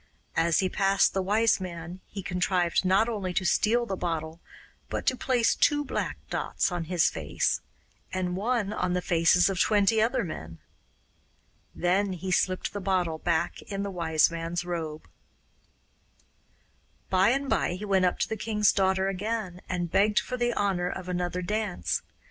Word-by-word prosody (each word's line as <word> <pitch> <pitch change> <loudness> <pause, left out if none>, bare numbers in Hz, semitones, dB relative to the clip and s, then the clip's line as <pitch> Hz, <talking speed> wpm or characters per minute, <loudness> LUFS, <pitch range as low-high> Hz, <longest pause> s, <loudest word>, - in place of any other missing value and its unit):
As 165 +2 +3
he 190 - +1
passed 195 +1 +2
the 195 - 0
Wise 215 +4 +2
Man 175 0 -7
he 195 -1 -7
contrived 180 -1 +1
not 190 +4 +3
only 195 -6 -3
to 185 - 0
steal 235 +6 +2
the 195 - -3
bottle 165 -2 -3 0.5
but - - -3
to 260 - +2
place 245 -2 +2
two 290 0 +2
black - - -3
dots - - -1
on 175 -2 -3
his 170 -4 +2
face, 80 -2 -1 0.5
and 180 -1 -2
one 210 0 0
on 180 -2 -1
the 180 - 0
faces 170 +1 +4
of 195 -2 -2
twenty 210 +2 +3
other 230 +2 +1
men. 80 - -7 1.2
Then 190 +2 +1
he 185 +1 -5
slipped 185 0 0
the 205 - -4
bottle 180 -4 0
back 165 -1 -1
in 200 -1 -4
the 200 - -3
Wise 165 -3 +2
Man's 170 +1 -3
robe. 160 -3 -4 2.0
By 190 +2 +4
and 275 +3 0
by 220 - +1
he 190 +4 -5
went 190 -2 +3
up 180 - +1
to - - +1
the 220 - -3
king's 210 -1 +2
daughter 190 -1 +2
again, 195 -1 -3
and 175 -2 -2
begged 210 +1 +3
for 255 - -4
the 240 -1 0
honour 185 -3 0
of 185 0 -6
another 180 0 -2
dance. 175 - -1
185 Hz, 165 wpm, -27 LUFS, 175-205 Hz, 2.0 s, faces